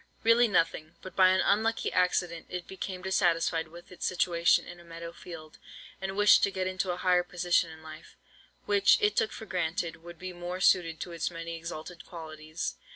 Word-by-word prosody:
Really 230 +1 +5
nothing; 165 -5 0
but 185 - -9
by 185 -1 +6
an 185 0 +3
unlucky 220 +3 +1
accident 180 -2 0
it 180 -1 -5
became 190 -1 -6
dissatisfied 170 -3 +1
with 170 +3 -14
its 180 - -9
situation 170 -2 +2
in 175 0 -10
a - - -14
meadow 170 0 -8
field, 160 -3 -11 0.4
and 190 0 -4
wished 205 0 +6
to - - +3
get 190 -1 -3
into 185 0 -2
a 175 - -1
higher 180 -1 +3
position 175 -1 +1
in 160 0 -12
life, 155 0 -12 0.5
which, 200 -1 +5
it 210 0 +2
took 215 - +1
for 220 - -8
granted, 170 -3 -2
would 170 +1 -12
be 185 +2 -7
more 175 +1 -5
suited 170 -4 +3
to 175 - -5
its 170 -1 -2
many 165 -1 -6
exalted 165 +1 -8
qualities. 155 -1 -6
175 Hz, 190 wpm, -29 LUFS, 165-185 Hz, 0.5 s, by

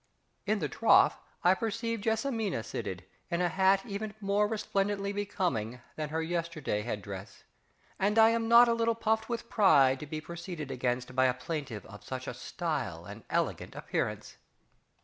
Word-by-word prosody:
In 215 +1 +2
the 160 -7 -1
trough 125 - +4 0.2
I 180 - +6
perceive 230 +2 -2
JESSIMINA 220 - -1
seated, 100 -5 -5 0.2
in 170 -1 0
a 180 -1 +2
hat 190 +3 +3
even 210 -1 -5
more 205 0 +2
resplendently 200 -2 -1
becoming 175 - -2 0.2
than 155 -1 -3
her 160 +1 -1
yesterday 165 -9 -2
head 105 -2 -4
dress, 100 -1 -8 0.6
and 205 +3 +1
I 225 0 +8
am 230 0 0
not 235 +1 +8
a 235 - +3
little 230 0 +1
puffed 220 0 0
with 235 0 -3
pride 140 -13 +5
to 150 - -7
be 155 +2 -4
proceeded 170 -3 -7
against 125 0 -2
by 130 0 +4
a 125 -1 +2
plaintiff 135 - -5
of 105 -2 -12
such 130 0 -5
a - - -4
stylish 125 - -4
and 105 +1 -10
elegant - - -1
appearance. - - -3
175 Hz, 170 wpm, -30 LUFS, 130-210 Hz, 0.6 s, I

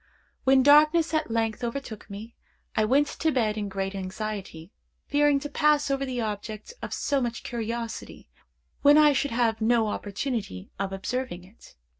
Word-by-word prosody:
When 265 0 +5
darkness 305 +4 +5
at 310 -3 0
length 225 0 -1
overtook 235 -3 -5
me, 215 +3 -8 0.4
I 215 - +3
went 275 +6 +4
to 315 +2 -1
bed 225 -6 +1
in 205 -2 -3
great 195 0 -3
anxiety, 195 -3 -6 0.3
fearing 290 -1 +3
to 290 - -4
pass 295 -1 +2
over 275 0 -1
the 250 -1 -3
object 215 - -5
of - - -6
so 280 -1 0
much 235 -1 -3
curiosity 230 -1 -5 0.5
when 290 +1 +7
I 300 -1 +6
should 285 +1 0
have 230 -2 0
no 225 0 +3
opportunity 205 - -4
of 195 -1 -2
observing 195 -1 -4
it. 195 +5 -18
235 Hz, 160 wpm, -26 LUFS, 210-280 Hz, 0.5 s, when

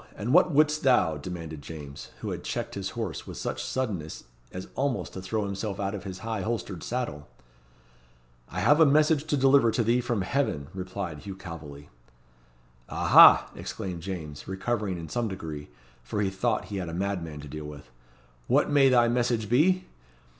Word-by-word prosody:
and 115 +6 -2
what 180 +2 +6
wouldst 155 +1 +3
thou?" 125 - +3
demanded 80 -1 -7
James, 70 -2 -9
who - - -3
had - - -5
checked - - -3
his - - -4
horse - - -4
with - - -7
such - - -3
suddenness 100 -12 -3 0.3
as 90 +1 -7
almost 135 -2 -2
to 95 - -6
throw 105 +3 -2
himself 100 0 -4
out 100 0 -1
of 105 -1 -6
his 95 -2 -6
high 110 -3 -2
holstered 105 -4 -3
saddle. 120 -13 -4 1.2
"I - - -3
have 145 +2 +5
a 160 - +8
message 150 +1 +3
to 150 -2 0
deliver 135 -2 +5
to 115 +1 +1
thee 120 +3 +2
from 120 -5 -1
Heaven," 90 - -1
replied 90 -4 -5
Hugh 100 +2 -7
Calveley. 75 -6 -9 1.0
"Aha!" - - +7
exclaimed 90 -3 -5
James, 80 -6 -6
recovering 95 0 -2
in 85 -1 -7
some 120 +4 -1
degree, 80 - -6 0.3
for - - -4
he 100 -2 +1
thought 105 +1 0
he - - -2
had 90 -3 -3
a 80 - -5
madman 90 -5 -3
to 75 - -9
deal 75 +2 -7
with. 75 -1 -10 0.6
"What - - +3
may 140 -2 +6
thy 120 -2 +5
message 120 -3 0
be?" 180 +10 +3
100 Hz, 175 wpm, -27 LUFS, 85-125 Hz, 1.2 s, a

